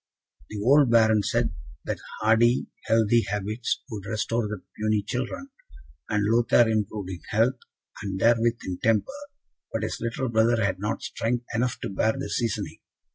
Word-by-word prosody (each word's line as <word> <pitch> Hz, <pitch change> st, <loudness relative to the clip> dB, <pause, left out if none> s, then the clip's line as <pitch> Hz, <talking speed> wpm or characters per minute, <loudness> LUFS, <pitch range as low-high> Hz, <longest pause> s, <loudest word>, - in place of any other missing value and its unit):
The 105 Hz, -, -5 dB
old 140 Hz, +2 st, +5 dB
Baron 110 Hz, -2 st, +5 dB
said 115 Hz, -1 st, 0 dB, 0.3 s
that -, -, -3 dB, 0.2 s
hardy, 115 Hz, +3 st, +4 dB, 0.2 s
healthy 115 Hz, +1 st, +3 dB
habits 105 Hz, +3 st, -2 dB
would 105 Hz, -2 st, -6 dB
restore 115 Hz, +1 st, -1 dB
the 105 Hz, -2 st, -6 dB
puny 110 Hz, -1 st, 0 dB
children; 125 Hz, -, -4 dB, 0.6 s
and 105 Hz, -1 st, +1 dB
Lothaire 115 Hz, +1 st, +4 dB
improved 105 Hz, -3 st, -2 dB
in 90 Hz, -, -6 dB
health, 115 Hz, +4 st, +2 dB, 0.4 s
and 95 Hz, -2 st, -4 dB
therewith 115 Hz, +1 st, +3 dB
in 90 Hz, -1 st, -4 dB
temper; 115 Hz, -, +2 dB, 0.6 s
but 110 Hz, -, -2 dB
his 110 Hz, -, -3 dB
little 115 Hz, +3 st, -2 dB
brother 115 Hz, 0 st, +3 dB
had 95 Hz, -2 st, -1 dB
not 105 Hz, +3 st, -3 dB
strength 120 Hz, +1 st, -2 dB
enough 120 Hz, +2 st, 0 dB
to -, -, -3 dB
bear 110 Hz, +3 st, +1 dB
the 135 Hz, -, -5 dB
seasoning. 115 Hz, -4 st, -2 dB
110 Hz, 155 wpm, -26 LUFS, 105-120 Hz, 0.6 s, old